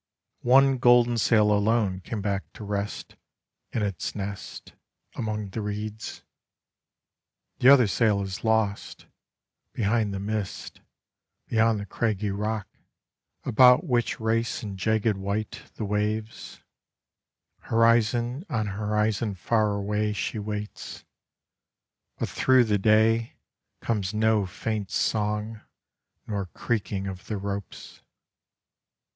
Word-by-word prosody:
One 135 +1 +5
golden 120 -1 +5
sail 105 -1 +4
alone 105 -2 +2
came 105 +2 -5
back 100 -1 -2
to - - -10
rest 100 0 -4 0.6
In 110 - -1
its 100 -4 -3
nest 100 -1 -7 0.4
Among 105 -2 -3
the 110 +4 -4
reeds. 105 +1 -5 1.4
The 125 - +6
other 135 -3 +8
sail 100 0 +2
is 95 -1 -6
lost; 110 -2 0 0.7
Behind 110 -1 +1
the 100 - -4
mist, 105 -1 -4 0.7
Beyond 115 -1 +2
the 100 - -5
craggy 105 0 -1
rock, 105 0 -2 0.8
About 125 +4 +6
which 125 -5 0
race 115 +2 -1
in 100 -2 -5
jagged 110 +2 +1
white 100 +2 -4
The 110 - -4
waves, 105 +2 -3 1.0
Horizon 115 +4 +2
on 110 -7 -1
horizon 105 +1 -1
far 105 +3 +1
away 105 +1 -1
She 110 +1 -3
waits. 105 0 -6 1.1
But - - -2
through 130 -1 +4
the 105 -3 +1
day, 110 +2 +3 0.5
Comes 105 -3 -2
no 110 -2 +2
faint 105 +1 -4
song, 105 0 -1 0.6
nor 100 -3 -3
creaking 100 -1 -3
of 95 -1 -7
the 105 - -3
ropes. 100 0 -6
105 Hz, 110 wpm, -26 LUFS, 100-115 Hz, 1.4 s, other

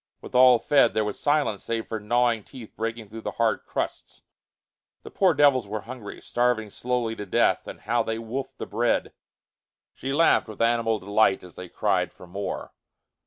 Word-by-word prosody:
With - - -11
all 125 -1 +7
fed, 135 -1 +3
there 110 -1 +2
was 105 - -4
silence 145 -8 +1
save 115 -1 -2
for 110 - -4
gnawing 120 +1 +1
teeth 120 -3 -12
breaking 115 0 -4
through 110 +1 -8
the - - -4
hard 115 -2 0
crusts. - - -5 0.8
The - - -10
poor 185 -5 +3
devils 140 -6 +4
were 105 +1 -4
hungry, 115 -2 -9
starving 120 -3 0
slowly 120 -1 -2
to 105 - -6
death, - - +2
and - - -9
how 120 0 +1
they 110 0 -2
wolfed 120 +4 -5
the - - -5
bread! - - 0 0.8
She 135 - -5
laughed 160 -1 +3
with 110 -2 -10
animal 115 -1 +2
delight 100 0 +2
as 90 - -12
they 90 -1 -9
cried - - 0
for - - -14
more. 100 +3 -5
115 Hz, 180 wpm, -25 LUFS, 110-125 Hz, 0.8 s, all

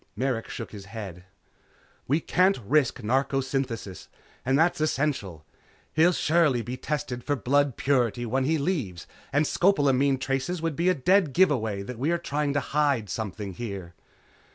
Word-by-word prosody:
Merrick 125 0 -2
shook - - -6
his 100 -2 -9
head. 100 -4 -8 0.8
"We 150 +5 +2
can't 185 +5 +3
risk 135 0 +2
narcosynthesis 130 -4 -1 0.4
and 130 +2 +2
that's 165 0 +2
essential. 130 - -1 0.5
He'll 165 +3 +5
surely 155 -8 +2
be 125 +4 -5
tested 130 -2 -4
for 145 - 0
blood 140 +2 +1
purity 120 -3 +1
when 130 +3 0
he 160 +3 +2
leaves, 140 - -2 0.3
and 145 +2 +2
scopolamine 140 -7 +3
traces 135 +7 -2
would 165 -2 -2
be 170 +4 +2
a 185 - +3
dead 170 +2 +3
give 185 +1 +5
away 110 -7 -1
that 120 +2 -7
we 140 +5 0
had 170 0 0
been - - -7
trying 145 0 0
to 145 - +2
hide 140 -9 0
something 105 -2 -4
here." 95 -5 -6
135 Hz, 160 wpm, -26 LUFS, 115-150 Hz, 0.8 s, He'll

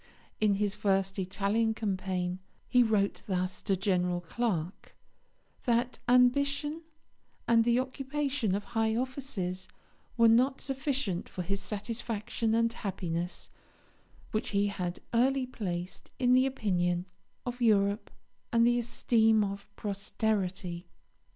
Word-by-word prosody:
In 210 -2 +3
his 205 0 0
first 195 -1 0
Italian 205 +4 0
campaign 185 -4 -2 0.3
he 250 - +5
wrote 210 -4 +2
thus 185 -1 -1
to 195 - +1
General 180 -2 +1
Clarke: 180 -2 -3 0.7
"That 240 0 +1
ambition 280 +5 +3 0.7
and 230 -1 +5
the 235 +1 +3
occupation 265 -3 -1
of 205 - -2
high 220 0 0
offices 230 -8 -3 0.5
were 230 -1 +6
not 255 +4 +4
sufficient 270 - -2
for 180 - -4
his 195 +2 -2
satisfaction 220 +1 -2
and 230 0 +2
happiness, 175 -5 -4 0.8
which 215 - -1
he 200 0 +2
had 180 -3 -4
early 260 +3 +3
placed 180 -8 -5
in 250 -1 +3
the 255 +1 +5
opinion 180 -8 0 0.4
of 245 0 -5
Europe 205 -2 +3 0.4
and 230 -1 +4
the 240 0 +4
esteem 225 -2 +3
of 200 0 -5
posterity." 195 -3 -2
215 Hz, 120 wpm, -30 LUFS, 190-245 Hz, 0.8 s, were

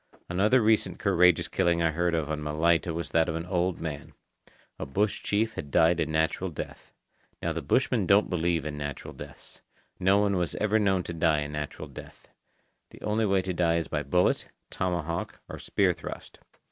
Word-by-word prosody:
Another 105 +8 +3
recent 110 0 +2
courageous 90 -1 +3
killing 85 -2 +1
I 85 - +2
heard 85 +2 0
of 80 -3 -1
on 75 -1 -3
Malaita 80 +3 +1
was 85 +1 -4
that 80 0 +2
of 80 - -2
an 80 +1 -4
old 90 -1 -1
man. 75 -3 -6 0.7
A - - -3
bush 100 +9 0
chief 110 +2 0
had 70 - -6
died 80 +4 +4
a 80 - +1
natural 80 +4 0
death. 80 - -8 0.5
Now - - -2
the - - -3
bushmen - - +1
don't 100 +2 +5
believe 85 -3 0
in 75 -1 -4
natural 70 0 -6
deaths. - - -12 0.4
No 95 +2 +4
one 100 -2 +2
was 90 -2 -1
ever 105 +1 +2
known 95 -3 +2
to 85 - -6
die 80 -2 +2
a 75 - -3
natural 75 0 -5
death. - - -12 0.6
The - - -15
only 105 +1 +1
way 95 -1 +2
to 95 - -2
die 85 -1 +2
is 85 -1 -1
by 75 - -2
bullet, 80 +6 +1 0.2
tomahawk, 85 -2 -3
or - - -8
spear 95 -3 +1
thrust. 85 - -9
85 Hz, 190 wpm, -27 LUFS, 80-95 Hz, 0.7 s, don't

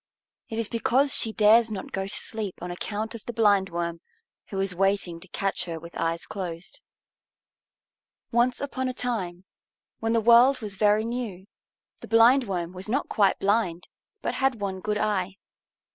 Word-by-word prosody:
It 225 - -4
is 230 -2 0
because 255 +5 +2
she 225 - +2
dares 220 +2 +5
not 195 -3 -6
go 195 0 -3
to - - -6
sleep 215 -4 -5
on 175 0 -5
account 210 +5 -4
of 230 - -8
the 240 - -5
Blindworm, 190 -6 +1 0.5
who 195 - -4
is 195 -1 0
waiting 195 -2 0
to 185 - -13
catch 195 0 -2
her 165 -2 -5
with 170 +1 -11
her - - -5
eyes 165 0 -1
closed. 180 - -6 1.5
Once 240 +1 +2
upon 260 -2 -2
a 255 - -5
time, 190 -8 -3 0.5
when 225 0 0
the 230 - +3
world 235 +4 +6
was 210 -4 -5
very 210 +2 +3
new, 230 -6 -4 0.5
the - - -10
Blindworm 225 -7 +3
was 185 +3 -5
not 270 +6 -1
quite 200 -3 +3
blind, 195 -4 0 0.3
but - - -1
had 265 -4 0
one 195 -2 -3
good 210 +2 -2
eye. 195 -3 -1
205 Hz, 170 wpm, -26 LUFS, 185-230 Hz, 1.5 s, world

